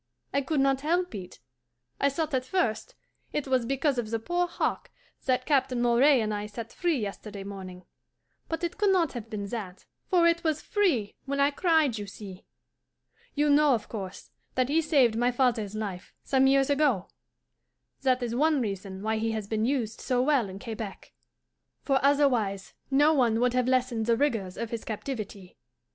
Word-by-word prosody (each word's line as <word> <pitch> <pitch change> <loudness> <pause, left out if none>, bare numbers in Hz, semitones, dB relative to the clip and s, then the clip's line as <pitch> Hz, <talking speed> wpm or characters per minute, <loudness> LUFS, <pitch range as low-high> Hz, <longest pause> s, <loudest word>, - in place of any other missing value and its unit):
I 280 - +2
could 285 +2 -1
not 270 0 +2
help 350 +3 0
it. 185 -3 -8 0.6
I 280 - +3
thought 310 +2 -3
at 255 -1 +1
first 315 - -1 0.4
it 295 -2 -2
was 255 -3 +1
because 275 0 +1
of 220 -3 -3
the 225 - 0
poor 350 +10 -1
hawk - - -2 0.4
that 255 -1 +1
Captain 265 -4 +1
Moray 245 +3 +4
and 215 -1 -1
I 205 0 -3
set 225 +2 -8
free 345 -4 0
yesterday 205 -2 -5
morning; 185 -2 -8 0.6
but 325 +1 -3
it 345 +3 -3
could 410 -1 +3
not 355 -6 +2
have 230 -3 -7
been 210 -3 -4
that, 195 -5 -6 0.2
for 355 -3 +4
it 335 0 +3
was 315 -2 +1
FREE 305 - 0
when 280 +1 -2
I 280 +1 +4
cried, 310 - +2
you 205 - -6
see. 195 -2 -10 0.9
You 295 0 +3
know, 290 -2 +5
of 220 - -6
course, 195 -3 -7 0.2
that 255 0 +1
he 320 +3 +3
saved 275 -8 +3
my 240 +2 +2
father's 235 -5 0
life, 200 -4 -5
some 265 -1 +3
years 275 +1 +3
ago? 275 -10 +2 0.9
That 255 -2 +2
is 235 -1 -2
one 300 +3 +3
reason 195 -3 -4
why 220 0 0
he 225 0 -1
has 215 -2 -3
been 220 +1 0
used 235 -4 -1
so 250 -1 0
well 265 -7 +2
in 190 - -8
Quebec, 220 -2 -7 0.7
for 270 -2 +2
otherwise 250 -9 +2 0.2
no 290 +3 +4
one 235 -6 +2
would 245 0 +2
have 250 -1 +1
lessened 250 -3 +1
the 230 -1 +3
rigours 225 -10 -1
of 230 -1 -4
his 230 -2 -4
captivity. 210 -5 -6
250 Hz, 185 wpm, -28 LUFS, 215-285 Hz, 0.9 s, know